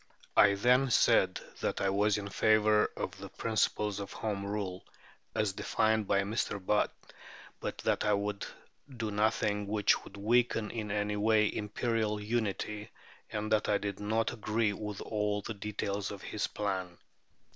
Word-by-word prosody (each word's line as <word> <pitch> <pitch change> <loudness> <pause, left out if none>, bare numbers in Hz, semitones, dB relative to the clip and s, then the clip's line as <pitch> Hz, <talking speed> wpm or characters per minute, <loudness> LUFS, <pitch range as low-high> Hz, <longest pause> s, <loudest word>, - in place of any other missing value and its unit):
"I 100 -1 +6
then 125 +6 +4
said 120 - +4 0.2
that - - -1
I 95 - +1
was 105 +1 +2
in 100 -1 -4
favour 110 +1 +3
of - - -3
the - - -8
principles 105 -2 0
of 100 - -6
Home 105 -3 -3
Rule, 100 -2 -3 0.5
as 105 -3 +1
defined 110 +1 +1
by 100 0 +3
Mr. 105 +1 -1
Butt, 105 +2 +1 0.7
but - - -4
that - - +1
I 105 - +2
would 100 0 -2 0.5
do 110 -2 -2
nothing 105 -1 +1
which 105 0 +2
would 100 - -12
weaken 115 +1 +2
in 110 -3 -4
any 105 0 -1
way 105 0 +3
Imperial 105 0 -1
unity, 105 -1 -2 0.4
and 110 0 -3
that 110 -1 +2
I 105 - +4
did 100 -1 -4
not 110 +2 0
agree 110 -1 0
with 105 0 -5
all 105 -1 -1
the 110 - -4
details 100 -1 -3
of 100 -2 -8
his 105 - -2
plan.... 95 -4 -3
105 Hz, 155 wpm, -31 LUFS, 100-110 Hz, 0.7 s, I